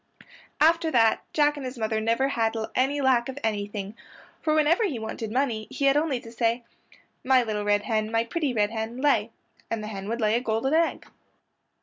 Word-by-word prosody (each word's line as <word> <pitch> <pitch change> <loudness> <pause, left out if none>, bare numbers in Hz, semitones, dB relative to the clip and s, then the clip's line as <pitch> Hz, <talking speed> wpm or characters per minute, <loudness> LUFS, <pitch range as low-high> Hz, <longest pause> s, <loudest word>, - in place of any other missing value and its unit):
After 330 +1 +4
that 225 -6 +3
Jack 295 -1 +2
and 285 - -6
his 255 0 -6
mother 220 -1 -1
never 230 +5 +1
had 225 -3 0 0.2
any 275 +3 +1
lack 260 -2 +2
of 265 - -6
anything, 205 -1 -3 0.5
for 310 -1 +1
whenever 310 +7 +3
he 310 - -1
wanted 220 0 -5
money 235 -4 -1
he 280 - -2
had 275 0 +5
only 295 -4 +1
to 230 - -11
say, 235 +1 0 0.6
"My 260 -1 +4
little 215 -2 -2
red 205 0 +2
hen, 215 -2 -1
my 225 0 +2
pretty 295 +4 -2
red 210 -3 +1
hen, 225 +1 -4
lay," 255 -6 +2 0.4
and 225 -2 -3
the 215 - -5
hen 195 -1 -6
would 230 +1 -2
lay 215 -1 +2
a 235 - +2
gold 225 0 -1
egg. 330 +1 +1
235 Hz, 200 wpm, -26 LUFS, 220-275 Hz, 0.6 s, had